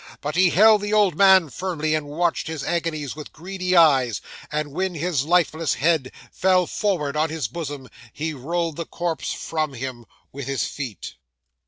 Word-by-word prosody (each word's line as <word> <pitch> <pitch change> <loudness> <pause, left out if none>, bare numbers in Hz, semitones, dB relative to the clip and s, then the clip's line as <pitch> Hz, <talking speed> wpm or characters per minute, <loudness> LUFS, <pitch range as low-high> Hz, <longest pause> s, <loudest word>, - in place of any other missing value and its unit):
But 150 +1 -4
he 185 +1 +5
held 215 +3 +6
the 205 +1 -2
old 205 -6 +4
man 190 -4 +6
firmly, 160 -3 -2
and 155 -2 -1
watched 165 +4 -1
his 160 -3 -4
agonies 155 -5 -2
with 150 -1 -9
greedy 185 +2 -3
eyes; 135 -9 +5 0.3
and 150 -1 -2
when 185 +3 -2
his 155 -3 -1
lifeless 165 -2 +2
head 155 -4 +1 0.2
fell 185 -1 +3
forward 170 -8 -1
on 155 +1 +1
his 155 -6 -2
bosom, 145 0 -6 0.2
he 155 +1 -4
rolled 165 +3 -2
the 170 - -4
corpse 170 -2 -3
from 155 -3 -3
him 120 -2 -6 0.2
with 140 -1 -7
his 135 -1 -1
feet. 125 - -7
160 Hz, 170 wpm, -23 LUFS, 145-180 Hz, 0.3 s, held